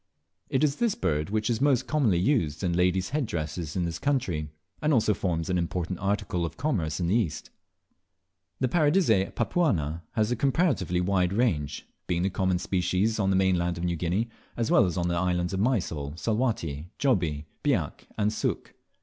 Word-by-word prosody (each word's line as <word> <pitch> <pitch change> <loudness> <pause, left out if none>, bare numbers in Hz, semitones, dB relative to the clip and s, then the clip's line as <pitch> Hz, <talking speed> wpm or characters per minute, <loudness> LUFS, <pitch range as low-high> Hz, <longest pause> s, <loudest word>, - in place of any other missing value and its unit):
It 135 - +1
is 145 -2 +2
this 235 -4 +1
bird 75 -3 -1
which 110 +1 0
is 120 0 0
most 140 -4 +3
commonly 130 - +2
used 85 - +1
in 90 -2 +1
ladies' 90 +1 +1
head 145 -4 0
dresses 80 -3 -4
in 90 -2 0
this 85 -1 -4
country, 95 - -1 0.3
and 150 0 +2
also 110 -2 +3
forms 85 -5 -2
an 90 -1 +1
important 85 +1 -2
article 100 -3 -1
of 85 - -4
commerce 95 - -1
in 90 - 0
the 85 - +1
East. 100 -10 -1 1.1
The 130 - +2
Paradisea 145 - +3
papuana 90 - 0
has 110 -1 +1
a - - +2
comparatively 135 - +1
wide 90 0 +1
range, 85 - 0 0.2
being 85 0 0
the 95 - 0
common 95 -1 +1
species 95 +5 0
on 95 -2 +2
the 95 - +2
mainland 90 -2 +2
of 85 - -4
New 85 -1 0
Guinea, 90 +7 0 0.3
as 115 -1 0
well - - +5
as 85 - -3
on 85 -1 0
the 85 - 0
islands 90 0 0
of 95 - -1
Mysol, 85 - 0
Salwatty, 90 - -1
Jobie, 85 - +1 0.2
Biak 115 - 0
and 105 0 +1
Sook. - - -2
95 Hz, 185 wpm, -27 LUFS, 85-115 Hz, 1.1 s, well